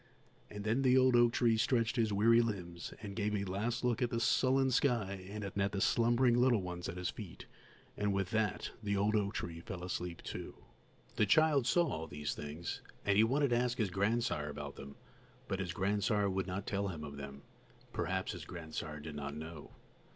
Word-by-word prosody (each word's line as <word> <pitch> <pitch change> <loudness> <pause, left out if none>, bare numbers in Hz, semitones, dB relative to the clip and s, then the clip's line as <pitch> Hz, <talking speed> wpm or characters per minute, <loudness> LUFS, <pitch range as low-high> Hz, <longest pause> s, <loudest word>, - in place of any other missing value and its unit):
And 105 -1 -7
then 110 +5 +1
the 130 -1 +5
old 130 -1 +5
oak 120 -1 +6
tree 115 -1 +3
stretched 115 0 +2
his 115 -4 +2
weary 115 +4 +5
limbs 90 -7 -4
and 100 -2 -6
gave 105 -1 0
a 100 - -1
last 105 +6 -2
look 125 0 +1
at 120 - +2
the 115 - -1
sullen 130 +3 +3
sky 105 -8 +1
and 105 +1 -5
at 100 0 -1
the 100 - -2
slumbering 120 +4 +3
little 120 -4 +4
ones 90 -1 -5
at 85 - -6
his 90 0 -2
feet; 100 -6 -9 0.5
and 105 0 0
with 95 -2 -1
that, 110 -3 0
the 100 -2 0
old 105 +2 +2
oak 100 -1 0
tree 85 -1 -4
fell 90 0 -7
asleep 90 -1 -4
too. - - -6 0.6
The 105 - +3
child 145 +3 +4
saw 175 -1 +4
all 80 - -3
these 75 -1 -3
things, 75 +4 -5 0.2
and 100 - +3
he 105 - +6
wanted 135 +3 +2
to 120 - +4
ask 125 0 0
his 105 -5 0
grandsire 100 -6 0
about 75 -1 -6
them, 70 +1 -9 0.5
but 95 -5 -2
his 90 -3 -2
grandsire 100 +2 +1
would 95 0 -1
not 95 +2 -3
tell 100 0 -1
him 80 -5 -5
of 70 -1 -7
them; 70 0 -8 0.5
perhaps 95 +2 -1
his 90 -5 -7
grandsire 80 -2 -6
did 75 +1 -7
not 70 -1 -5
know. 80 -1 -8
100 Hz, 200 wpm, -34 LUFS, 90-115 Hz, 0.6 s, oak